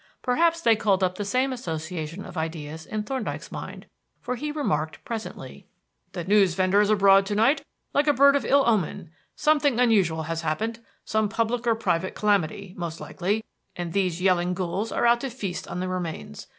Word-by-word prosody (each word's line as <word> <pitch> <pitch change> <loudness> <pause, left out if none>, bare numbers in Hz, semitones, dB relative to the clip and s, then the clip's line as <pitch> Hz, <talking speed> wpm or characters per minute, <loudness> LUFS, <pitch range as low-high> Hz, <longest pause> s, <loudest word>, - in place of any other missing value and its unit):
Perhaps 330 +6 +2
they 230 -7 +5
called 200 -3 +1
up 180 -1 +2
the - - 0
same 255 +6 0
association 165 -4 -5
of - - -10
ideas 160 -1 -5
in 215 -1 -3
Thorndyke's 260 +4 -4
mind, - - -7 0.3
for 250 - -3
he 295 +5 -4
remarked 155 - -2
presently: 225 -2 -7 0.5
"The 175 - -4
newsvendor 190 0 +3
is 210 - +2
abroad 195 -2 +6
to 205 - -1
night 230 +8 +3 0.3
like 290 +2 +2
a 295 - +5
bird 280 +2 +6
of 280 - +1
ill 280 0 +4
omen. 195 -6 0 0.2
Something 290 -5 +2
unusual 195 -10 +3
has 165 +1 -3
happened; 215 +9 -2 0.3
some 220 -1 +1
public 230 +2 -1
or 230 - +4
private 185 -4 -1
calamity, 200 -2 0
most 170 -2 -5
likely, 205 +5 -2 0.3
and 175 -2 -5
these 185 -4 0
yelling 180 -1 +2
ghouls 190 +4 -2
are - - 0
out 235 0 +4
to 270 - -3
feast 200 -7 -5
on 180 - -4
the 185 - -2
remains. 175 - -5
200 Hz, 180 wpm, -25 LUFS, 175-235 Hz, 0.5 s, abroad